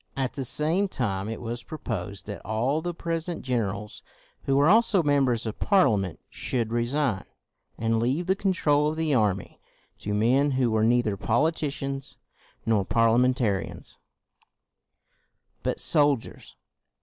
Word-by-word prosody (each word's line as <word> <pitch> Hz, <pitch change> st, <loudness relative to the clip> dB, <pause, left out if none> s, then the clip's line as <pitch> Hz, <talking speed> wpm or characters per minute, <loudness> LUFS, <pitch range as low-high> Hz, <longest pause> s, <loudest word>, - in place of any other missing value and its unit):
At 130 Hz, -2 st, -1 dB
the 135 Hz, -, -4 dB
same 160 Hz, +10 st, +1 dB
time 105 Hz, -, -2 dB
it 115 Hz, -, -5 dB
was 120 Hz, 0 st, -5 dB
proposed 100 Hz, -, -6 dB
that 105 Hz, -1 st, -7 dB
all 125 Hz, +8 st, 0 dB
the 175 Hz, +1 st, -2 dB
present 165 Hz, 0 st, -4 dB
gen 125 Hz, -2 st, 0 dB
erals 105 Hz, +2 st, -6 dB, 0.4 s
who 135 Hz, -, +2 dB
were 140 Hz, +2 st, +4 dB
also 210 Hz, -2 st, +4 dB
members 135 Hz, -5 st, +2 dB
of 110 Hz, -, -5 dB
Parlia 160 Hz, -, +4 dB
ment 95 Hz, -4 st, -5 dB
should 115 Hz, -3 st, -2 dB
resign, 120 Hz, -2 st, 0 dB, 0.5 s
and 115 Hz, 0 st, +1 dB
leave 130 Hz, +9 st, 0 dB
the 190 Hz, +2 st, +2 dB
control 150 Hz, -7 st, +2 dB
of 155 Hz, -, -3 dB
the 160 Hz, -2 st, 0 dB
army 105 Hz, -6 st, 0 dB, 0.4 s
to 105 Hz, 0 st, -3 dB
men 130 Hz, +7 st, +3 dB
who 130 Hz, -3 st, +1 dB
were 110 Hz, 0 st, +2 dB
neither 115 Hz, -2 st, +2 dB
248 -, -, -16 dB
CROMWELL 120 Hz, +1 st, +3 dB
politicians 140 Hz, -4 st, -3 dB, 0.5 s
nor 110 Hz, -3 st, +2 dB
Parliamentarians, 115 Hz, -1 st, +1 dB, 1.6 s
but -, -, -2 dB
sol 145 Hz, -2 st, +3 dB
diers. 115 Hz, -, -13 dB
125 Hz, 150 wpm, -26 LUFS, 110-150 Hz, 1.6 s, were